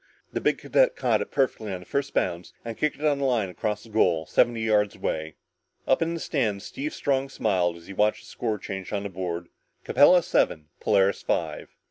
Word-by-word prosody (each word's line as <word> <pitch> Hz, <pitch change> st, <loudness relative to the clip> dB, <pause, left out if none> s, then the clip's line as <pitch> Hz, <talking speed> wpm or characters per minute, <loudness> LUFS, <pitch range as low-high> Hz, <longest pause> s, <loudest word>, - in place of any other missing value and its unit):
The -, -, -2 dB
big -, -, +2 dB
cadet -, -, +2 dB
caught -, -, +1 dB
it -, -, -4 dB
perfectly 115 Hz, -6 st, 0 dB
on 90 Hz, -1 st, -4 dB
the -, -, -13 dB
first 140 Hz, +5 st, -2 dB
bounce 85 Hz, +1 st, -1 dB
and 115 Hz, -1 st, -4 dB
kicked 150 Hz, +5 st, 0 dB
it 150 Hz, -, -5 dB
on 145 Hz, -2 st, +2 dB
a -, -, -1 dB
line 120 Hz, -7 st, +1 dB
across 105 Hz, +4 st, -3 dB
the 115 Hz, -, -15 dB
goal, 80 Hz, -7 st, +2 dB
seventy 115 Hz, +8 st, +2 dB
yards 105 Hz, -2 st, +2 dB
away. 80 Hz, 0 st, -3 dB, 0.5 s
Up 130 Hz, -, +3 dB
in 165 Hz, +1 st, 0 dB
the -, -, -4 dB
stands, 110 Hz, -12 st, -1 dB
Steve 300 Hz, +3 st, -5 dB
Strong 135 Hz, -1 st, 0 dB
smiled 90 Hz, -9 st, 0 dB
as 85 Hz, -, -15 dB
he 100 Hz, -, -8 dB
watched 105 Hz, +2 st, +2 dB
the -, -, -15 dB
score 110 Hz, -3 st, -2 dB
change 95 Hz, -1 st, -6 dB
on 100 Hz, -1 st, -2 dB
the 100 Hz, -, -4 dB
board: 85 Hz, -2 st, -4 dB, 0.3 s
"Capella 175 Hz, +5 st, +6 dB
seven 75 Hz, -2 st, +1 dB
Polaris 95 Hz, 0 st, +2 dB
five!" -, -, -2 dB
105 Hz, 210 wpm, -26 LUFS, 95-135 Hz, 0.5 s, Capella